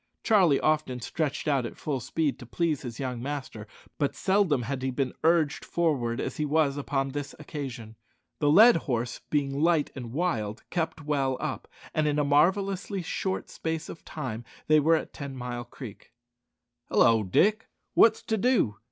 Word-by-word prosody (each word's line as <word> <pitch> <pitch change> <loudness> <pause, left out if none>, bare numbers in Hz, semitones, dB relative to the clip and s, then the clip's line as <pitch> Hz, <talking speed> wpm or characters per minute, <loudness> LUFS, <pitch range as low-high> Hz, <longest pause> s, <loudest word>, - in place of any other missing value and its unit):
Charlie 185 -10 +4
often 155 -5 0
stretched 150 +5 -3
out 140 -4 +2
at 120 - -6
full 145 -4 -2
speed 145 +1 -1
to 125 - -10
please 160 +1 0
his 120 -3 -7
young 125 -3 -3
master, 130 -6 -5 0.3
but 145 -2 0
seldom 190 -10 +2
had 130 +2 -3
he 130 - -1
been 130 0 -1
urged 160 -3 +2
forward 130 -8 0
as - - -3
he 150 - 0
was 150 -1 +2
upon 135 -1 -1
this 145 +1 -5
occasion. 130 -7 -7 0.4
The 145 - +2
led 220 +10 +8
horse 120 0 -2
being 140 -2 0
light 165 -2 +2
and 120 -4 -7
wild, 120 -9 -2
kept 160 -3 -2
well 135 -3 0
up, - - -4 0.3
and 155 -1 +1
in 150 0 +1
a 150 - +3
marvellously 190 +6 +1
short 190 +2 -3
space 160 -1 -4
of 165 - -9
time 125 -7 -5 0.2
they 155 0 +5
were 160 +3 +4
at 160 - -4
Ten 140 -3 -7
mile 120 -1 -5
Creek. 120 -4 -11 0.8
"Hallo, 115 -1 +5
Dick, 205 - +2 0.3
wot's 225 -1 +5
to 220 - -1
do?" 210 - +2
145 Hz, 170 wpm, -27 LUFS, 130-160 Hz, 0.8 s, led